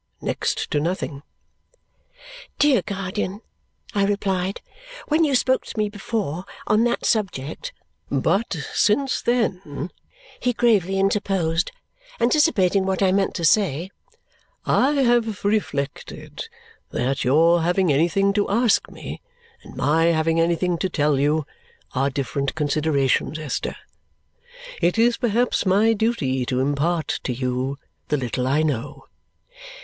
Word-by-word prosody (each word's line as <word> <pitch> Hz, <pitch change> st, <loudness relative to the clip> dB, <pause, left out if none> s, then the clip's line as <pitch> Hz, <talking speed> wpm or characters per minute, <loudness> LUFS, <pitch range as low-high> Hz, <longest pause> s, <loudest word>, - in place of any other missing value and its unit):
Next -, -, -2 dB
to 150 Hz, -, +2 dB
nothing." 160 Hz, -3 st, -3 dB, 1.4 s
"Dear 290 Hz, -4 st, +4 dB
guardian," 195 Hz, 0 st, -4 dB, 0.5 s
I 200 Hz, -, +2 dB
replied, 195 Hz, -2 st, -1 dB, 0.5 s
"when 310 Hz, +2 st, +3 dB
you 285 Hz, -4 st, +2 dB
spoke 260 Hz, +1 st, +2 dB
to -, -, -8 dB
me 210 Hz, -1 st, +1 dB
before 200 Hz, -5 st, -3 dB, 0.2 s
on 215 Hz, +2 st, +3 dB
that 240 Hz, -, -1 dB
subject 200 Hz, -, -1 dB, 0.2 s
" -, -, -39 dB
"But 210 Hz, +4 st, +1 dB, 0.2 s
since 265 Hz, +6 st, +2 dB
then," 185 Hz, -, -1 dB, 0.5 s
he 245 Hz, -, 0 dB
gravely 205 Hz, -6 st, +2 dB
interposed, 195 Hz, -4 st, +1 dB, 0.5 s
anticipating 230 Hz, -, +3 dB
what 190 Hz, +1 st, 0 dB
I 190 Hz, -, +4 dB
meant 195 Hz, 0 st, +1 dB
to 170 Hz, -, -1 dB
say, 180 Hz, -1 st, +2 dB, 0.7 s
"I 275 Hz, +3 st, +3 dB
have 235 Hz, -4 st, +1 dB
reflected 150 Hz, -10 st, -3 dB, 0.4 s
that 130 Hz, +3 st, -1 dB
your 165 Hz, +6 st, +4 dB
having 175 Hz, -1 st, +2 dB
anything 175 Hz, +7 st, +2 dB
to 205 Hz, 0 st, 0 dB
ask 230 Hz, +1 st, +2 dB
me, -, -, -8 dB, 0.4 s
and -, -, -13 dB
my 160 Hz, +3 st, +2 dB
having 165 Hz, 0 st, +2 dB
anything 170 Hz, +1 st, +1 dB
to 190 Hz, -, -1 dB
tell 150 Hz, -4 st, +1 dB
you, 150 Hz, +2 st, +1 dB, 0.5 s
are 135 Hz, +2 st, +1 dB
different 140 Hz, 0 st, -2 dB
considerations, 150 Hz, -1 st, +1 dB
Esther. 155 Hz, -3 st, -3 dB, 1.1 s
It 175 Hz, +5 st, +2 dB
is 235 Hz, +1 st, +3 dB
perhaps 240 Hz, 0 st, +1 dB
my 210 Hz, +3 st, +4 dB
duty 200 Hz, -, 0 dB
to 125 Hz, -, 0 dB
impart 145 Hz, +5 st, 0 dB
to -, -, -3 dB
you 125 Hz, +2 st, -2 dB, 0.3 s
the 150 Hz, -, +1 dB
little 125 Hz, -1 st, -2 dB
I 145 Hz, +4 st, +2 dB
know." 140 Hz, -7 st, -3 dB
180 Hz, 125 wpm, -23 LUFS, 150-210 Hz, 1.4 s, Dear